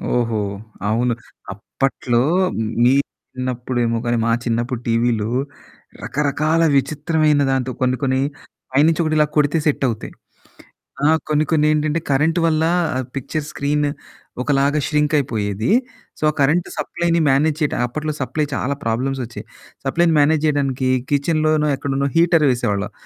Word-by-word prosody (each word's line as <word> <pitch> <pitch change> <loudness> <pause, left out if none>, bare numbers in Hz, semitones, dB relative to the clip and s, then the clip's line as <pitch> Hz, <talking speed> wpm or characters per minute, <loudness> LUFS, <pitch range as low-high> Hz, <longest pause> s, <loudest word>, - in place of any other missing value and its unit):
ఓహో! 115 -3 0 0.5
అవును. 120 +2 +1 0.4
అప్పట్లో 120 +3 -1 0.6
మీ 125 +2 +5 0.4
చిన్నప్పుడేమో 125 -2 -1
గానీ, 120 0 +1
మా 115 - +2
చిన్నప్పుడు 120 +1 -1
టీవీలు 115 -2 +1 0.7
రకరకాల 150 +3 0
విచిత్రమైన 150 +2 +1
దాంతో 130 -1 0
కొన్ని 130 0 +1
కొన్ని 130 -1 +1 0.5
పైనుంచి 155 +5 +3
ఒకటి 155 -1 0
ఇలా 150 - +4
కొడితే 150 +2 +3
సెట్ 145 -2 +1
అవుతాయి. 115 -2 -5 0.9
ఆ! - - +5 0.2
కొన్ని 150 0 +2
కొన్ని 150 -1 +3
ఏంటంటే, 155 +1 0
కరెంటు 160 +5 +2
వల్ల 160 -1 +2 0.5
పిక్చర్ 145 +3 -3
స్క్రీన్ 145 +1 0 0.5
ఒకలాగా 140 +2 +2
ష్రింక్ 150 0 +1
అయిపోయేది. 110 -5 -2 0.5
సో, - - -18
ఆ - - -4
కరెంట్ 155 +6 +2
సప్లైని 170 -1 0
మేనేజ్ 145 +3 +2
చేయడం 150 -5 0
అప్పట్లో 150 +5 -4
సప్లై 150 +3 -1
చాలా 140 +2 -1
ప్రాబ్లమ్స్ 130 +4 -1
ఒచ్చాయి. 115 - -9 0.4
సప్లైని 165 +4 +2
మేనేజ్ 150 +1 +3
చేయడానికి 135 -3 0 0.2
కిచెన్‌లోనో 155 +1 +2
ఎక్కడనో 140 0 -1
హీటర్ 165 -2 +4
వేసేవాళ్ళం. 105 -4 -2
140 Hz, 130 wpm, -20 LUFS, 125-155 Hz, 0.9 s, మీ